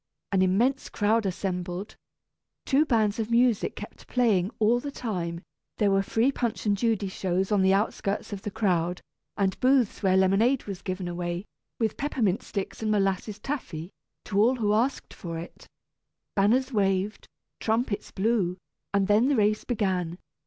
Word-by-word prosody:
An 195 -1 +3
immense 230 +9 +2
crowd 215 0 +1
assembled. 180 +1 -4 0.7
Two 290 +3 +3
bands 220 -3 +2
of 220 0 -2
music 235 -2 +2
kept - - -10
playing 215 -7 +2
all 225 +3 +3
the 285 - -5
time; 180 -11 -4 0.4
there 205 -2 +3
were 195 0 +3
free 225 +6 +1
Punch 235 -5 -2
and 205 -1 +3
Judy 215 -1 0
shows 190 0 -1
on 205 -2 +3
the 190 0 +4
outskirts 205 0 -1
of 195 - -5
the 205 - -4
crowd, 180 -4 0 0.4
and 195 -2 0
booths 255 -4 +3
where 190 -2 +3
lemonade 205 +8 +3
was 195 -2 -6
given 185 -1 -4
away, 175 +1 -3 0.3
with 220 -3 0
peppermint 230 -9 0
sticks 200 +1 -5
and 220 - -1
molasses 200 0 0
taffy, 195 - -5 0.3
to 200 -1 +1
all 245 +4 +4
who 210 -4 +1
asked 245 +6 0
for 165 -2 -6
it. 170 +2 -9 0.7
Banners 245 +7 +2
waved, 195 0 0 0.3
trumpets 220 -2 -1
blew, 195 -3 0 0.4
and 200 -1 +3
then 210 +4 +4
the 285 - +3
race 215 -1 +2
began. 185 -7 -1
205 Hz, 160 wpm, -27 LUFS, 190-230 Hz, 0.7 s, the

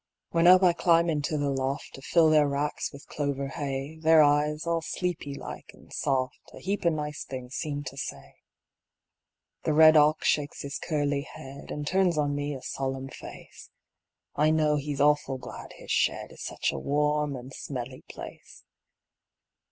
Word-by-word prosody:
When 170 0 +4
up 185 +1 +8
I 180 -2 +6
climb 170 -1 +3
into 150 +1 -1
the 145 -1 0
loft 135 +1 -3
To 135 - -10
fill 160 +2 +4
their 150 -2 +5
racks 145 +1 -2
with 140 0 -12
clover 140 -2 -3
hay, 140 +2 -4
Their 160 -1 +6
eyes, 150 +2 +2
all 170 0 0
sleepy 165 -4 -3
like - - -8
and - - -17
soft, 130 -2 -1 0.2
A - - -10
heap 195 0 -3
of 170 - +4
nice 150 -1 -4
things 130 -1 -7
seem 145 -2 -3
to 135 0 -7
say. 70 - -6 1.3
The 155 - 0
red 155 +1 +8
ox 150 +1 +4
shakes 145 -1 0
his 140 0 -5
curly 145 -3 0
head, 140 -1 -10
An' 150 0 -4
turns 180 0 +2
on 145 -1 +1
me 145 0 -2
a 130 - -9
solemn 135 0 -3
face; - - -11 0.7
I 155 +1 +3
know 155 -1 +3
he's 145 -1 -3
awful 145 -2 +3
glad 125 - -9
his - - -9
shed - - +1
Is - - -12
such - - -1
a - - -4
warm 150 - 0
and 130 +1 -9
smelly 130 -1 -6
place. - - -10
145 Hz, 175 wpm, -28 LUFS, 140-155 Hz, 1.3 s, up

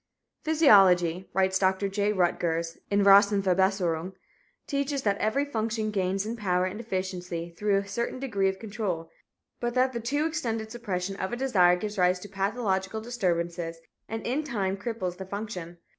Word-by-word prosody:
"Physiology," 190 - +5
writes 190 0 +2
Dr. 190 +1 +2
J. 205 +1 0
Rutgers 170 -3 0
in 200 0 +3
Rassenverbesserung, 195 -3 +4 0.5
"teaches 280 -1 -1
that 200 -1 +1
every 270 +7 +1
function 225 -4 -2
gains 195 0 0
in 225 +2 -3
power 185 -5 0
and 185 +4 -4
efficiency 185 -5 -4
through 205 +1 +1
a 200 0 -2
certain 235 +5 -3
degree 200 -8 0
of 190 - -4
control, 195 -6 -4 0.5
but 240 0 -2
that 255 +1 +3
the 235 - -2
too 285 +7 0
extended 230 -9 -2
suppression 195 -5 -3
of 190 - -3
a - - -2
desire 190 -9 +4
gives 205 +2 -5
rise 180 0 +4
to 205 - -8
pathological 195 0 -1
disturbances 175 -7 -2 0.3
and 225 0 -4
in 270 +6 0
time 200 -9 -1
cripples 200 -4 -4
the 190 - -6
function. 190 -4 -6
200 Hz, 160 wpm, -27 LUFS, 185-225 Hz, 0.5 s, Physiology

